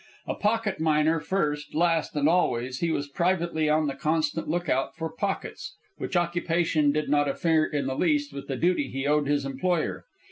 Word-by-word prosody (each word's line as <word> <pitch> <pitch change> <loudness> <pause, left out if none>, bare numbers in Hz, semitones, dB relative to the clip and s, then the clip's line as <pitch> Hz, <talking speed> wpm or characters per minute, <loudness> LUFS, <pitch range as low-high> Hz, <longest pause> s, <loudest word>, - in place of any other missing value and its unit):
A - - -2
pocket 210 -3 0
miner, 160 +1 +2
first, 150 -4 -2
last, 165 -1 +1
and 145 0 +2
always, 130 -7 +1
he 170 - 0
was 145 -3 -1
privately 170 0 0
on 155 +1 +3
the 140 - -1
constant 155 +3 -1
lookout 160 -5 0
for 160 0 -4
pockets, 195 +4 -4 0.2
which - - -4
occupation 170 -3 +1
did 150 +1 -1
not 145 0 +2
interfere 160 +2 +2
in 145 -3 -2
the 130 - -1
least 290 - +1
with 140 0 -7
the 135 - -3
duty 175 -1 +1
he 135 +1 -4
owed 150 0 +2
his 145 -1 +1
employer. 155 +5 -1
155 Hz, 180 wpm, -26 LUFS, 145-175 Hz, 0.2 s, on